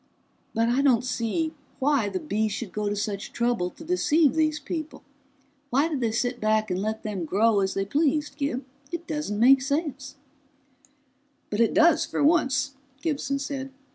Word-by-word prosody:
"But 225 +1 +2
I 245 +3 +2
don't 250 -4 +3
see 255 +6 -1 0.2
why 270 -6 +2
the 190 -2 -3
Bees 210 +7 -1
should 210 -2 -5
go 210 -1 -2
to 205 - -1
such 205 -1 -3
trouble 235 -7 0
to 325 - -13
deceive 320 -3 +3
these 310 -1 +1
people. 315 -3 -6 0.7
Why 280 +4 +3
did 300 -4 -2
they 230 -2 +1
sit 245 +2 -1
back 215 -1 +1
and 180 +1 -1
let 220 +1 -3
them 205 -5 -3
grow 205 +6 +3
as 190 -1 0
they 195 - 0
pleased, 295 +4 0
Gib? 280 -3 -2 0.3
It 340 0 -4
doesn't 300 -11 -3
make 260 +3 +6
sense!" 275 -1 -2 1.4
"But 210 - -1
it 230 - +2
does, 330 -1 +5
for - - -2
once," 280 -3 +2 0.3
Gibson 275 -3 -1
said. 275 -1 -4
260 Hz, 170 wpm, -26 LUFS, 215-295 Hz, 1.4 s, make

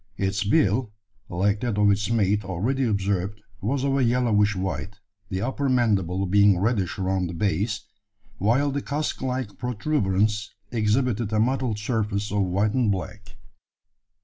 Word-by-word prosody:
Its 100 +1 0
bill, 105 +3 +2 0.4
like 100 +4 +1
that 120 -4 -1
of 105 -1 +5
its 105 +2 0
mate 105 -2 +2
already 105 +9 -1
observed, 100 -1 -1 0.2
was 130 +6 -1
of 140 -1 +1
a 135 - +2
yellowish 115 -4 +2
white, 95 +1 -3 0.3
the 95 0 -2
upper 135 +2 -1
mandible 100 -7 +1
being 100 0 +5
reddish 100 -2 0
around 95 -1 0
the 85 - -6
base, 105 +4 0 0.6
while 125 +8 +2
the 140 +1 -2
casque 150 +2 -3
like 130 -4 -3
protuberance 105 -5 0 0.2
exhibited 115 0 +1
a 110 - +1
mottled 125 -1 +1
surface 105 -2 -2
of 105 0 +1
white 100 +3 +1
and 125 -5 +2
black. 105 +2 -6
105 Hz, 150 wpm, -25 LUFS, 100-120 Hz, 0.6 s, of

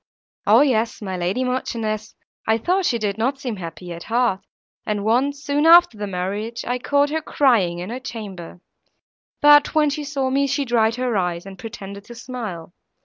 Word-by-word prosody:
"O 220 +5 +7
yes, 235 -5 +1
my 190 -3 -4
lady 180 +8 -1
Marchioness, 225 -4 -3 0.3
I 220 0 +3
thought 365 - +1
she 235 - +1
did 210 -1 -2
not 260 +5 0
seem 245 -6 -4
happy 175 0 -7
at 170 - -9
heart, 230 -4 +1 0.4
and 210 -1 -2
once, 275 +6 +1
soon 290 +2 +1
after 340 -7 +7
the 205 0 -4
marriage, 200 +5 -4
I 250 +1 -1
caught 285 +3 +1
her 320 +1 -1
crying 230 - +2
in 180 +5 -6
her 250 - -4
chamber; 200 -8 -8 0.8
but, 295 0 +6
when 300 -2 +3
she 300 +1 -3
saw 275 -2 -2
me, 280 +1 +2
she 280 +1 -1
dried 230 -2 +2
her 250 -2 -1
eyes, 175 -1 -2
and 190 -1 -10
pretended 200 -2 -8
to 240 - -11
smile. 215 -10 -7
230 Hz, 185 wpm, -22 LUFS, 200-275 Hz, 0.8 s, O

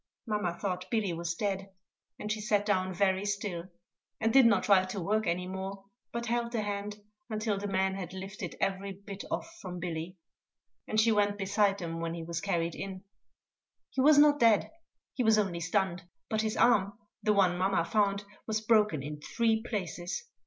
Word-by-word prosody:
Mamma 210 -6 -1
thought 185 -1 -3
Billy 210 -5 0
was 170 0 -3
dead, 195 0 -2 0.5
and 210 - -4
she 215 0 -2
sat 205 -1 +1
down 185 -2 +1
very 190 +1 +1
still, 200 -4 -2 0.5
and 225 0 +1
did 265 -3 +8
not 200 -5 +3
try 195 -2 +5
to 185 +2 -4
work 215 +3 0
any 175 +2 0
more, 190 +1 -6 0.3
but 235 0 -3
held 235 0 -1
the 220 -2 0
hand 205 0 -4 0.3
until 215 -2 -1
the 205 - -3
men 190 -1 +1
had 185 -3 -5
lifted 190 +2 -6
every 195 0 -1
bit 200 +1 -8
off - - -2
from 180 -1 -6
Billy; 175 +1 -4 0.7
and 215 - +1
she 225 +1 +5
went 205 -1 +2
beside 200 0 +2
them 165 -3 -4
when 165 0 -3
he 165 - -5
was 170 0 -4
carried 170 -4 0
in. 190 -1 -6 0.9
He 265 - 0
was 295 +2 +7
not 290 0 +6
dead, 225 -4 +4 0.4
he 250 - 0
was 220 -1 +5
only 190 -5 0
stunned; 180 +1 0 0.3
but 215 0 +2
his 220 0 -2
arm, 205 -4 +3 0.2
the 215 - +2
one 190 -3 +4
mamma 185 -2 +1
found, 200 -1 +1 0.2
was 220 -1 0
broken 215 -9 +3
in 150 +1 -6
three 225 +4 +1
places. 185 - -4
200 Hz, 185 wpm, -30 LUFS, 185-215 Hz, 0.9 s, did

